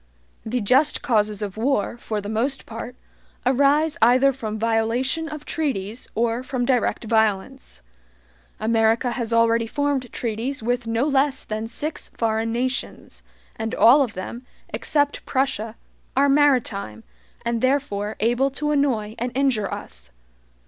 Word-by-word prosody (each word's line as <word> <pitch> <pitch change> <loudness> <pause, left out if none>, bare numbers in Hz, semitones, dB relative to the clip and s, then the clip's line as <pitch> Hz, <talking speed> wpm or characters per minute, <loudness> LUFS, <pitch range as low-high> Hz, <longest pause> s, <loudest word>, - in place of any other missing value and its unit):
The 240 +2 -2
JUST 265 +8 +3
causes 210 -4 +1
of 200 0 -5
war, 235 -1 0
for 215 -3 -4
the 200 - -7
most 240 +6 -1
part, 230 +2 -7 0.5
arise 285 +5 +3
either 255 +3 +5
from 220 -4 -5
violation 230 +8 0
of 305 -1 -8
treaties 240 - -3
or 230 +1 0
from 255 -1 -2
direct 250 -2 +1
violence. 220 - -1 0.8
America 225 +2 +2
has 235 -2 -3
already 230 0 +3
formed 280 -2 -1
treaties 235 +3 -3
with 245 0 -1
no 230 +3 +1
less 275 -1 +2
than 215 +1 -4
six 295 +7 -3
foreign 225 0 0
nations, 245 - -3 0.3
and 225 0 -3
all 260 +6 +7
of 245 -5 0
them, 235 +6 -6 0.3
except 290 -1 0
Prussia, 260 -5 -1 0.4
are 280 +1 +5
maritime, 245 - +2 0.4
and 235 -1 0
therefore 255 -6 0
able 240 +5 +2
to 295 +2 -2
annoy 250 -8 +1
and 245 +1 -2
injure 260 -7 +1
us. - - -8
235 Hz, 135 wpm, -23 LUFS, 220-270 Hz, 0.8 s, all